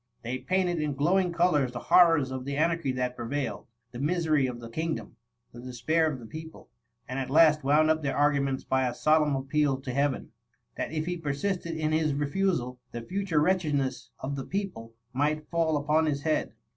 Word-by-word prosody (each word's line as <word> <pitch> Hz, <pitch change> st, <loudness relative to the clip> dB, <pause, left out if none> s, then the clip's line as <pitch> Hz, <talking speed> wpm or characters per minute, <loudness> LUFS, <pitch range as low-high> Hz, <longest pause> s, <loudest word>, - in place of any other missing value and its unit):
They 125 Hz, +2 st, -3 dB
painted 180 Hz, +3 st, 0 dB
in 150 Hz, -2 st, -2 dB
glowing 175 Hz, +6 st, +2 dB
colours 160 Hz, -7 st, +2 dB
the -, -, -5 dB
horrors 165 Hz, -1 st, +4 dB
of 130 Hz, -1 st, -4 dB
the 140 Hz, +1 st, -4 dB
anarchy 165 Hz, -2 st, +1 dB
that 125 Hz, -1 st, -2 dB
prevailed, 130 Hz, +4 st, -4 dB, 0.2 s
the 120 Hz, -, -8 dB
misery 155 Hz, -2 st, +1 dB
of 125 Hz, -1 st, -6 dB
the 115 Hz, -, -8 dB
kingdom, 160 Hz, +7 st, -4 dB, 0.4 s
the 120 Hz, -, -10 dB
despair 155 Hz, +6 st, 0 dB
of 135 Hz, -, -5 dB
the 115 Hz, -, -10 dB
people, 160 Hz, +6 st, -10 dB, 0.4 s
and 130 Hz, +2 st, -3 dB
at 130 Hz, -, -3 dB
last 155 Hz, 0 st, +5 dB
wound 150 Hz, +3 st, +4 dB
up 160 Hz, 0 st, 0 dB
their 140 Hz, -2 st, -2 dB
arguments 140 Hz, -2 st, +1 dB
by 130 Hz, -1 st, +1 dB
a 120 Hz, -, -3 dB
solemn 155 Hz, -1 st, +3 dB
appeal 135 Hz, 0 st, 0 dB
to 130 Hz, -2 st, -5 dB
Heaven, 140 Hz, 0 st, -1 dB, 0.4 s
that -, -, -3 dB
if 155 Hz, -1 st, -2 dB
he 175 Hz, +1 st, -2 dB
persisted 165 Hz, +2 st, -2 dB
in 155 Hz, -1 st, 0 dB
his 155 Hz, -2 st, +1 dB
refusal, 145 Hz, -4 st, -1 dB
the 120 Hz, 0 st, -6 dB
future 185 Hz, +1 st, -1 dB
wretchedness 150 Hz, -7 st, 0 dB
of 140 Hz, +2 st, -4 dB
the 135 Hz, -, -4 dB
people 180 Hz, -, -5 dB, 0.2 s
might 150 Hz, +3 st, 0 dB
fall 165 Hz, -2 st, +1 dB
upon 150 Hz, +2 st, +2 dB
his 145 Hz, -1 st, -1 dB
head. 155 Hz, -1 st, 0 dB
150 Hz, 190 wpm, -28 LUFS, 130-160 Hz, 0.4 s, last